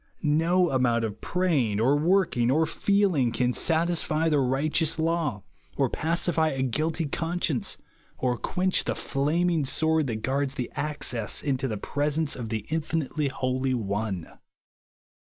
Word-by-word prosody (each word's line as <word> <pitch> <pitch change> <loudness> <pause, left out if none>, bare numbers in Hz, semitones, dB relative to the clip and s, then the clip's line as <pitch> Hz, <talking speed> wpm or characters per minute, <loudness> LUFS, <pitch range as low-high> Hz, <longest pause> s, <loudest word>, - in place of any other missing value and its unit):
No 165 +4 +3
amount 120 -3 +2
of 110 0 -6
praying, 150 - +1
or 130 +6 +3
working, 165 -6 +2
or 155 +5 +3
feeling, 180 - +2
can 125 +1 0
satisfy 165 0 0
B - - +2
u - - +3
the 150 - +3
righteous 145 +5 +1
law, 160 - -1 0.3
or 135 -3 +1
pacify 165 0 +1
a 135 -4 -1
guilty 155 +6 -1
con 165 +4 -3
science, 145 -8 0 0.4
or 125 -1 0
quench 185 +1 0
the - - -1
flaming 160 +3 0
sword 160 +2 +1
that 110 -3 -4
guards 135 +1 -1
the 125 -3 -4
access 130 -7 -1
into 135 -2 0
the 110 -4 -3
presence 145 +6 -1
of 120 -3 -6
the 110 -2 -3
infinitely 155 -2 -1
Holy 130 0 -1
One. 100 -5 -2
145 Hz, 150 wpm, -26 LUFS, 125-165 Hz, 0.4 s, No